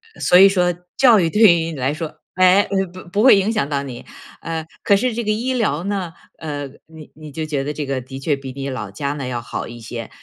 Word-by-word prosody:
呃， - - -14
所 180 - +5
以 195 - +9
说 180 -2 +2 0.2
教 240 -5 +6
育 170 -3 +2
对 210 +7 0
于 170 -7 +6
你 - - -7
来 135 +1 -1
说， 155 0 -7
哎， 185 +2 +5 0.3
不 185 - -10
不 200 +4 0
会 260 - +8
影 195 +3 +1
响 215 -11 0
到 140 -1 -2
你。 130 -3 -8 0.3
呃， 165 -1 -4 0.2
可 200 - +4
是 245 +4 0
这 235 0 -3
个 215 - +1
医 240 +5 -1
疗 190 - 0
呢， 190 -4 -3 0.2
呃， 145 -2 -5 0.2
你 160 -2 -14
你 155 0 -11
就 160 +2 -3
觉 145 -3 -2
得 150 - -3
这 150 -1 -4
个 135 -1 -2
的 135 +2 -9
确 140 +1 0
比 135 -1 -8
你 140 +1 -5
老 115 -6 -5
家 140 +8 -3
呢 140 -3 -5
要 120 -2 -3
好 120 - -5
一 120 0 -10
些， 115 0 -7
160 Hz, 270 characters per minute, -20 LUFS, 140-195 Hz, 0.3 s, 以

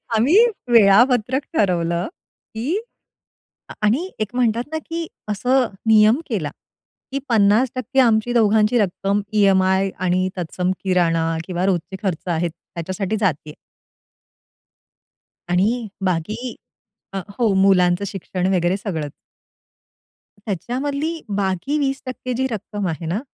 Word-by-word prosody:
आम्ही 265 - +4 0.3
वेळापत्रक 240 +4 +5 0.2
ठरवलं, 170 -1 +1 0.5
की 300 - -1 1.0
आणि 260 - +1
एक 215 +2 -3
म्हणतात 240 -1 +1
ना 315 - -1
की 330 0 -3 0.2
असं 250 +5 +2 0.2
नियम 220 +4 +5
केला, 190 - -2 0.6
की 275 - 0
50% 245 +4 +2
आमची 230 -1 +3
दोघांची 220 0 +3
रक्कम 200 0 0
ईएमआय 190 -1 +3
आणि 185 0 +1
तत्सम 180 +1 -2
किराणा 165 -3 +1
किंवा 180 0 -1
रोजचे 190 0 -1
खर्च 185 -3 -3
आहेत 170 +1 0
त्याच्यासाठी 185 +5 -5
जातेय. 155 -6 -1 2.0
आणि 215 +6 +1 0.2
बाकी 210 +8 -2 0.6
अ, 195 - -2 0.2
हो 235 - +3
मुलांचं 190 -1 +3
शिक्षण 185 -1 -3
वगैरे 180 +1 +1
सगळंच. 160 -8 -4 1.3
त्याच्यामधली 280 - -3 0.2
बाकी 195 - -1
20% 270 -2 -3
जी 265 +2 0
रक्कम 205 -2 -4
आहे 165 0 -4
ना, 175 +6 -1
205 Hz, 110 wpm, -21 LUFS, 180-245 Hz, 2.0 s, वेळापत्रक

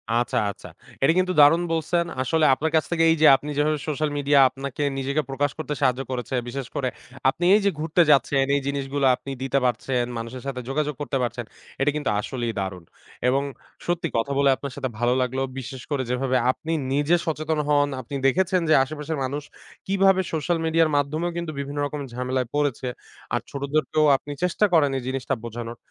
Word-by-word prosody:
আচ্ছা, 120 0 0
আচ্ছা। - - -12 0.4
এটা 140 - +5
কিন্তু 185 0 +1
দারুন 155 +4 +6
বলছেন, 170 +2 0 0.2
আসলে 155 +5 +2
আপনার 155 +4 -1
কাছ 160 - +3
থেকে 165 -1 +2
এই - - +4
যে, 155 - +8
আপনি 145 +3 -5
যেভাবে 150 +1 +2
social 155 0 -1
media 145 0 +2
আপনাকে 135 +2 -5
নিজেকে 140 +3 0
প্রকাশ 135 +1 0
করতে 155 -1 -3
সাহায্য 125 +1 +2
করেছে, 125 +1 -3
বিশেষ 135 0 -5
করে 130 -2 0 0.4
আপনি 175 +6 -2
এই 215 - +3
যে, 200 - +4
ঘুরতে 160 +3 +2
যাচ্ছেন, 135 0 +3
এই 140 - +1
জিনিসগুলা 140 0 0
আপনি 135 - -8
দিতে 135 +1 +1
পারছেন, 125 +1 0
মানুষের 115 +2 -6
সাথে 130 -2 -3
যোগাযোগ 150 +1 -1
করতে 145 -1 -1
পারছেন। 120 0 -3 0.4
এটা 145 - +3
কিন্তু 150 -2 -1
আসলেই 120 +1 -3
দারুণ 95 -2 -4 0.4
এবং 135 +2 +2 0.4
সত্যি 175 0 0
কথা 115 +5 -1
বলে 140 -1 +4
আপনার 140 0 -7
সাথে 135 -2 -3
ভালো 120 +1 +2
লাগলো। 130 +1 -1 0.2
বিশেষ 130 0 -7
করে 140 -2 0
যেভাবে 130 +1 +1
আপনি 160 +5 -7 0.2
নিজে 145 +4 +3
সচেতন 155 -1 -1
হন, 145 -1 +4
আপনি 130 +3 -7
দেখেছেন 185 +5 +2
যে, - - +6
আশেপাশের 150 +3 -5
মানুষ 140 +3 -3 0.4
কিভাবে 195 -1 +4
social 165 +2 0
media 160 +1 +2
এর 155 - -1
মাধ্যমেও 155 +5 -1
কিন্তু 170 -2 -3
বিভিন্ন 140 +1 -4
রকম 145 0 -4
ঝামেলায় 125 0 -1
পড়েছে। 145 -4 0 0.5
আর - - +1
ছোটদেরকেও 150 +2 0
আপনি 145 - -10
চেষ্টা 180 +4 +2
করেন 145 -4 +4
এই 130 - -5
জিনিসটা 135 0 -2
বোঝানোর। 115 0 -6
140 Hz, 190 wpm, -24 LUFS, 130-155 Hz, 0.5 s, যে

